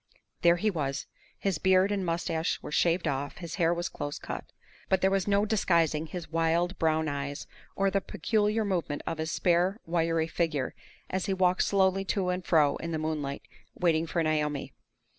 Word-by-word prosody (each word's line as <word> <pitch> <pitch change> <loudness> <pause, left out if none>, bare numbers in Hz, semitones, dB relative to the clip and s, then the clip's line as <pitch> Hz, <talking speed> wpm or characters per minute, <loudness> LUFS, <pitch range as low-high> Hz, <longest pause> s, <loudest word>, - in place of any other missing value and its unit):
There 170 0 +6
he 210 +5 +1
was! 140 -5 -2 0.3
His 195 -6 -1
beard 190 +1 +4
and 200 -2 0
mustache 165 -1 -1
were - - -6
shaved 170 +2 +2
off; 140 0 -2
his 170 0 -6
hair 165 0 +4
was 175 0 -1
close 145 -1 -5
cut. - - -6 0.4
But 190 - +3
there 190 - +3
was 195 -1 +1
no 200 0 +3
disguising 170 -7 +2
his 165 -1 -7
wild, 165 +3 +1
brown 160 -1 +2
eyes, 140 0 -4 0.3
or 195 0 +2
the 195 - +1
peculiar 215 +1 0
movement 170 -7 -2
of 165 - -3
his 160 +1 -2
spare, 180 +4 +2
wiry 165 -1 +1
figure, 160 -5 -1 0.4
as 185 0 -1
he 195 - +1
walked 185 -1 +3
slowly 195 -1 +2
to 190 -2 0
and 180 0 -1
fro 150 -5 +3
in 165 - -5
the 160 - -1
moonlight 155 -3 -3 0.3
waiting 165 -2 +2
for 170 0 0
Naomi. 150 -2 -1
170 Hz, 180 wpm, -29 LUFS, 155-190 Hz, 0.4 s, There